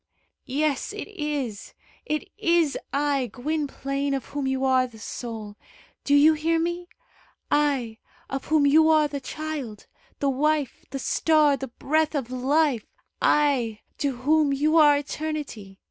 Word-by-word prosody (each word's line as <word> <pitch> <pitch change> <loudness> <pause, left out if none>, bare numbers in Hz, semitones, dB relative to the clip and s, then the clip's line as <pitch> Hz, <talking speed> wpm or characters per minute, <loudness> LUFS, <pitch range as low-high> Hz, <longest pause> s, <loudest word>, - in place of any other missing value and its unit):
"Yes, 290 +6 -1
it 420 - -6
is! 295 - -4 0.3
It 305 +6 -2
is 335 -6 +2 0.2
I, 280 -3 0
Gwynplaine, 280 0 -2
of 270 - -4
whom 285 -2 -3
you 265 0 0
are 260 -1 +3
the 235 -3 -15
soul. 220 -2 -7 0.5
Do 285 - +3
you 300 +2 +7
hear 320 +2 0
me? 345 +1 -2 0.6
I, 270 -7 +1 0.3
of 270 0 -4
whom 305 -1 +3
you 315 +3 +5
are 310 -1 +4
the 285 -1 -5
child, 290 -8 -6 0.3
the 280 - -1
wife, 295 0 0
the 275 - -4
star, 300 +1 +3
the 270 -1 -6
breath 310 +5 0
of 260 -4 -3
life; 265 -1 +1 0.3
I, 255 -8 +2 0.2
to 280 -3 0
whom 295 +3 +2
you 300 +3 +1
are 295 -2 +7
eternity. 290 -9 -5
285 Hz, 145 wpm, -25 LUFS, 260-310 Hz, 0.6 s, you